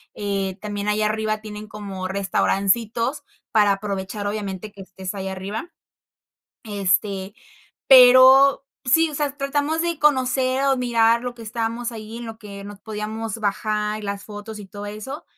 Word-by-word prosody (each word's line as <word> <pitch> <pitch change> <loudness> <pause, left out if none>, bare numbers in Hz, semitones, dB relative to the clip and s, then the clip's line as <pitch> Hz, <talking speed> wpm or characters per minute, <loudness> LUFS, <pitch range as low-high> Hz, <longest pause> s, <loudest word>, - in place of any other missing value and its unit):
eh, 195 -2 -2
también 205 -1 -4
allá 210 +1 +1
arriba 215 0 -1
tienen 210 0 -8
como 200 -3 -6
restaurancitos 215 +7 0 0.3
para 210 -3 +4
aprovechar, 200 0 -4
obviamente, 205 -1 -4
que 200 -1 -12
estés 190 0 -7
ahí 195 -1 -5
arriba. 195 - -5 0.9
Este, 200 -1 -1 0.5
pero, 260 +2 +8 0.2
sí, 320 +6 +4
o - - -8
sea, 290 -1 -2
tratamos 290 +3 0
de 340 -2 -1
conocer 260 -2 +2
o 270 -1 +3
mirar 235 -2 +3
lo 245 -1 -4
que 235 - -11
estamos 230 +2 -3
ahí 220 0 -8
en 240 - -7
lo 225 -1 -8
que 200 -2 -9
nos 205 0 -10
podíamos 220 +1 -5
bajar 210 0 -1
y - - -11
las 200 -1 -4
fotos 210 +1 -8
y 200 - -10
todo 205 +1 -8
eso, 215 +9 -7
215 Hz, 155 wpm, -22 LUFS, 200-245 Hz, 0.9 s, pero